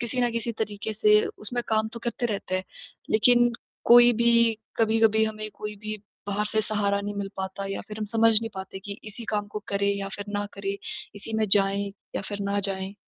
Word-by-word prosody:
किसी 240 +1 -1
न 245 -1 +2
किसी 230 0 -2
तरीके 215 -1 -3
से 210 0 +5 0.2
उसमें 240 +3 -3
काम 220 0 +2
तो 235 - -6
करते 240 +1 -1
रहते 200 -4 -3
हैं 185 - -3 0.5
लेकिन 240 +2 +5 0.3
कोई 240 0 +8
भी 235 0 +4 0.2
कभी-कभी 220 -1 +4
हमें 215 0 -4
कोई 210 0 -5
भी 215 +1 -4 0.3
बाहर 205 +1 0
से 220 - +1
सहारा 205 -2 0
नहीं 205 0 -4
मिल 200 -1 -3
पाता 190 +1 -4
या 195 - -3
फिर 210 0 -7
हम 215 - -1
समझ 225 +1 +4
नहीं 225 0 -4
पाते 190 0 -6
कि 200 +1 -7
इसी 215 +2 -7
काम 205 0 0
को 210 - -4
करें 200 0 +1
या 200 0 -3
फिर 205 - -5
ना 205 0 -1
करें? 200 0 -3 0.4
इसी 205 +2 -8
में 220 0 +2
जाएँ 200 0 +2 0.2
या - - -2
फिर 205 -1 -5
ना 200 - +1
जाएँ? 195 0 -3
210 Hz, 210 wpm, -26 LUFS, 200-225 Hz, 0.5 s, कोई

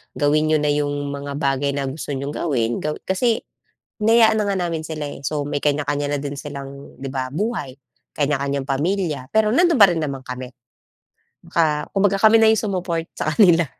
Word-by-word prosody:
gawin 150 +2 +2
n'yo 155 - +3
na 150 - +2
'yong 145 -1 -1
mga 140 0 -5
bagay 140 -1 0
na 135 -2 -2
gusto 145 0 -5
niyong 140 +2 -4
gawin. 120 -8 -1
Gawi 150 0 -2
kasi 225 +5 0 0.6
hinayaan 220 0 +4
na 210 - +1
nga 200 -1 0
namin 160 -1 -4
sila, 155 -1 -5
eh. - - -9
So, 150 -2 -1
may 145 0 -2
kanya-kanya 145 0 0
na 145 - -1
din 140 0 -5
silang, 140 -1 -8
'di 135 - -4
ba, 130 -1 -2
buhay. 195 - -2 0.4
Kanya-kanyang 140 -1 -1
pamilya 150 0 -1
pero 220 -1 +4
nandoon 335 +4 +3
pa 200 - +10
rin 170 - -1
naman 140 -4 -3
kami. 125 0 -7 1.0
Ka 150 -3 +1
kumbaga 200 0 +2
kami 220 +1 +7
na 225 - +5
yung 220 - +3
sumupport 180 -5 -2
sa 155 0 -1
kanila. 170 -4 +5
150 Hz, 185 wpm, -21 LUFS, 140-190 Hz, 1.0 s, pa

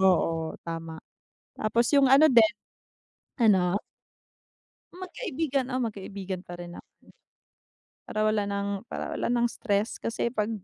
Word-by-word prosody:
Oo 165 -4 +2
tama. 165 -1 -5 0.6
Tapos 230 +2 +1
yung 275 -2 +5
ano 285 +4 +8
din 235 -6 +6 0.9
ano? 195 -5 +4 1.2
Magkaibigan, 295 - -2
oo 255 - 0
magkaibigan 195 -3 -6
pa 175 - -8
rin 175 0 -8
na - - -9 1.3
Para 215 0 0
wala 215 -1 +2
ng 200 0 -2
para - - -4
wala - - -1
ng 240 0 +3
stress 205 -2 -1
kasi 230 +1 -1
'pag 210 +1 0
215 Hz, 125 wpm, -27 LUFS, 190-240 Hz, 1.3 s, ano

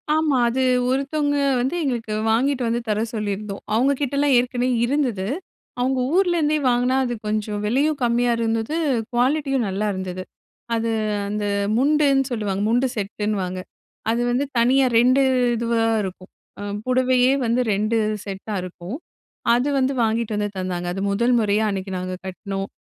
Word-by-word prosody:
ஆமா. 310 -4 +2
அது 260 +2 -1 0.3
ஒருத்தவங்க 285 +2 0 0.2
வந்து 265 +7 -1
எங்களுக்கு 235 -5 -2 0.2
வாங்கிட்டு 255 +2 +1
வந்து 235 +1 0
தர 210 +1 +1
சொல்லியிருந்தோம். 205 -1 -4
அவங்க 260 +5 +3
கிட்டலாம் 280 0 +2
ஏற்கனவே 245 +1 +1 0.2
இருந்தது. 240 -8 0 0.5
அவங்க 260 +1 +1
ஊர்லேருந்தே 345 -5 +2
வாங்கினா 245 +2 +2
அது 240 -1 -2
கொஞ்சம் 210 -1 -2
விலையும் 280 +6 +1
கம்மியா 240 0 +2
இருந்தது, 225 +5 -1 0.4
குவாலிட்டியும் 270 0 +1
நல்லா 200 +3 -1
இருந்தது. 185 -1 -5 0.5
அது 230 0 -1 0.4
அந்த 210 0 -3 0.3
முண்டுன்னு 280 +1 +3
சொல்லுவாங்க. 205 -4 -2
முண்டு 245 +3 +2
செட்டுன்னுவாங்க. 200 -3 -2 0.5
அது 235 +1 +1
வந்து 265 +4 +1
தனியா 260 +3 +4
2 255 +3 +4 0.3
இதுவா 230 0 0 0.2
இருக்கும். 185 0 -8 0.5
புடவையே 255 0 +3
வந்து 235 +2 +2
2 215 +3 0 0.3
செட்டா 200 +2 -6
இருக்கும், 180 +4 -7 0.6
அது 245 +3 +2
வந்து 270 +1 +1
வாங்கிட்டு 225 -1 0
வந்து 205 0 -1
தந்தாங்க. 180 -1 -3
அது 195 - -4
முதல் 235 +5 +2
முறையா 215 0 +2
அன்னைக்கு 190 0 -4
நாங்க 185 0 -4
கட்னோம். 195 +1 -5
235 Hz, 135 wpm, -22 LUFS, 205-265 Hz, 0.6 s, தனியா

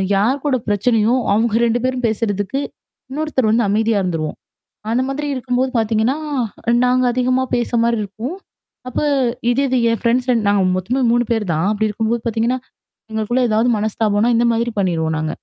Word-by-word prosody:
யார் 245 +8 +1
கூட 285 -3 +2
பிரச்சனையோ, 220 +3 +2 0.2
அவங்க 225 +2 +2
2 235 +1 +1
பேரும் 255 -1 -1
பேசுறதுக்கு 215 +2 -1 0.5
இன்னொருத்தர் 280 -5 0
வந்து 225 -2 +2
அமைதியா 220 +1 +1
இருந்துருவோம். 165 -4 -3 0.5
அந்த 240 +2 +2
மாதிரி 290 +2 -3
இருக்கும்போது 255 0 -1
பாத்தீங்கன்னா, 225 +5 +1 0.7
நாங்க 255 0 +2
அதிகமா 255 +1 +1
பேச 240 -1 -1
மாரி 235 0 +1
இருக்கும். 220 - -6 0.5
அப்ப 255 - -2 0.5
இதே 265 +3 +1
இது 260 - +1
என் 230 - -1
ஃப்ரெண்ட்ஸ் 250 +2 +1 0.2
நாங்க 205 -1 +3
மொத்தமாவே 245 +8 0
3 240 +1 +2
பேரு 220 -3 0
தான். 160 +5 0
அப்படி 215 +1 0
இருக்கும்போது 225 +3 -1
பாத்தீங்கன்னா, 230 +3 0 0.5
எங்களுக்குள்ள 220 +3 -1
ஏதாவது 220 +3 +2
மனஸ்தாபம்னா 215 +1 +1
இந்த 235 +1 +3
மாதிரி 235 +1 -1
பண்ணிருவோம் 160 -4 0
நாங்க. 155 0 -2
230 Hz, 155 wpm, -19 LUFS, 210-250 Hz, 0.7 s, நாங்க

